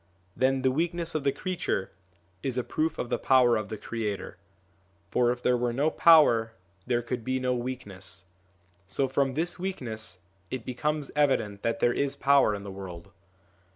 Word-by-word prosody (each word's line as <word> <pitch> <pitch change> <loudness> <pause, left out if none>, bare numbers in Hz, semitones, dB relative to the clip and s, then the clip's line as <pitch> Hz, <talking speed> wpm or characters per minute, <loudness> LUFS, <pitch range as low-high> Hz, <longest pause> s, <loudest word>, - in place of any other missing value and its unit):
Then 130 0 +2
the 130 - +4
weakness 170 +3 -1
of 155 - -1
the 140 - +3
creature 155 - -2 0.5
is 130 -2 -3
a 125 - +1
proof 160 +4 -1
of 120 - -3
the - - +1
power 125 -3 +5
of 110 -1 -2
the 110 - -4
Creator; 105 -2 -4 0.7
for 120 -1 +3
if 125 0 -5
there 125 - +3
were 120 -1 0
no 145 +5 +1
power 120 -11 +6 0.3
there 120 -1 +1
could 120 0 -4
be 130 +2 -1
no 130 0 0
weakness; 100 -8 -6 0.6
so 135 +7 0
from 135 0 0
this 170 +3 -1
weakness 115 - -4 0.3
it 130 -3 -5
becomes 150 +3 -2
evident 115 -9 +1
that 115 +5 -1
there 120 - +4
is 140 -1 0
power 140 -6 +4
in 100 - -7
the 100 - -7
world. 90 -3 -9
125 Hz, 175 wpm, -28 LUFS, 115-140 Hz, 0.7 s, power